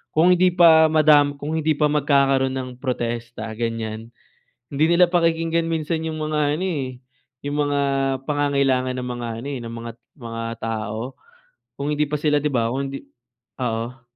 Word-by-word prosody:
Kung 165 +3 +5
hindi 180 0 +3
pa 160 -2 +7
madam 150 -2 +4
kung 145 +2 -5
hindi 155 0 +1
pa 150 0 +2
magkakaroon 135 -2 +2
ng 130 -1 -4
protesta, 120 -3 -4
ganiyan, 115 -1 -3 0.6
hindi 145 +2 +1
nila 175 +1 +5
pakikinggan 165 -1 +1
minsan 160 0 -2
'yong 160 -1 -4
mga 155 0 -1 0.2
ano, - - -1
eh, 130 -7 -4 0.5
'yong 145 0 -2
mga 145 0 +1 0.5
pangangailangan 140 -3 +1
ng 125 0 -4
mga 120 -1 -4
ano, 135 - -7
eh, - - -6
ng 115 0 -7
mga 115 0 -6 0.3
mga 115 -2 -6 0.2
tao. 110 +2 -4 0.6
Kung 145 +2 -1
hindi 150 +1 +1
pa 150 - -1
sila 150 -1 +2
'di 150 - 0
ba, 115 -3 +1
kung 135 +2 -2
hindi 135 - -7 0.6
oo. 120 +1 -3
140 Hz, 165 wpm, -22 LUFS, 120-155 Hz, 0.6 s, pa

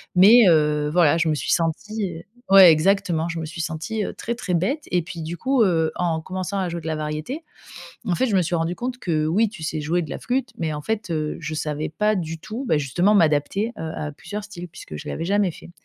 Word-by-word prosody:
Mais 210 +4 +8
heu, 150 -2 +3
voilà, 165 -2 +4
je 165 -1 +1
me - - +2
suis - - -2
sentie 170 +1 -2 0.3
ouais 190 -3 +10
exactement, 170 0 +2
je 170 - -4
me 160 - -4
suis 165 +2 -6
sentie, 170 +7 -3
heu, - - -5
très, 235 - -4
très 180 -7 -2
bête. 270 - 0
Et 180 - +2
puis 170 0 -7
du 165 +2 -5
coup, 260 -2 +2
heu, 165 -5 +2
en 170 -2 0
commençant 185 +3 -4
à 185 - -1
jouer 170 0 -5
de 160 - -7
la 155 - -1
variété, 155 - -4 0.6
en 180 - +1
fait 260 - +1
je 210 - +1
me - - +4
suis 170 +1 -1
rendu 165 +2 -1
compte 250 +3 -4
que: 155 -3 0
«oui 205 +7 +2
tu 195 -7 -10
sais 155 0 -2
jouer 170 +4 0
de 155 - -9
la - - -5
flûte» 250 0 -2
mais 160 -2 -2
en 150 - -5
fait, 220 +2 -2
heu, 155 -1 -2
je 155 -1 -5
savais 150 0 -3
pas 210 +7 +1
du 165 -3 -3
tout, 220 +9 -6
bah, 155 - +4
justement 175 +9 +2
m'adapter, 165 +5 +2
heu, 160 -1 -4
à 150 -1 -4
plusieurs 205 +8 -7
styles 180 -4 -8
puisque 165 - -10
je - - -9
l'avais 165 - -3
jamais 200 0 +2
fait. 170 - -13
170 Hz, 245 wpm, -23 LUFS, 160-205 Hz, 0.6 s, ouais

